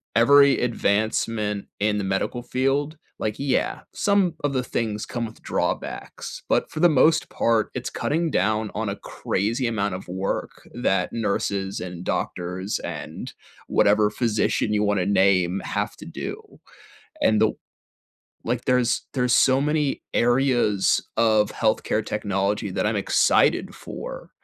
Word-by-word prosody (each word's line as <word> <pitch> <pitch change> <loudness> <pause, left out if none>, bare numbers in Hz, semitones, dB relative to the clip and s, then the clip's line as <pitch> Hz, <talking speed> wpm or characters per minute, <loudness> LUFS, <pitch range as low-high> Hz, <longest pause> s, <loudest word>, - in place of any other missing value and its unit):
every 140 +4 +6
advancement 110 -2 0
in 105 0 +1
the - - -2
medical 95 +5 -1
field 135 +5 -1 0.2
like, 105 -1 -2
yeah, 140 -1 0
some 200 -4 +2
of 145 - +1
the 130 -2 0
things 110 -3 -2
come 120 -1 -3
with 110 0 -11
drawbacks, - - -4
but - - +1
for 155 - -5
the 175 - +7
most 155 +2 +3
part, 115 -2 +1
it's 125 0 -4
cutting 165 +3 -1
down 110 -4 +1
on 110 0 -2
a 100 - -3
crazy 115 +6 -2
amount 100 -4 -1
of 95 - -8
work 95 +2 -4
that 95 -6 0
nurses, 100 -3 -1
and 90 -1 -6
doctors, 90 +3 -2
and - - -6 0.4
whatever 105 0 +3
physician 105 -1 0
you 105 0 +2
wanna 100 -3 +1
name 95 -2 +3
have - - -2
to - - -11
do, - - -8 0.6
and 110 -1 +4
the 110 - +4 0.9
like, 120 +1 -2
there's 125 -2 +2
there's 125 -2 +2
so 130 0 +4
many 150 -2 0
areas 120 -5 +2
of 110 -2 +3
health 110 -1 +1
care 110 - 0
technology 100 -1 -1
that - - -1
I'm - - 0
excited - - +2
for, - - -8
110 Hz, 140 wpm, -24 LUFS, 100-125 Hz, 0.9 s, the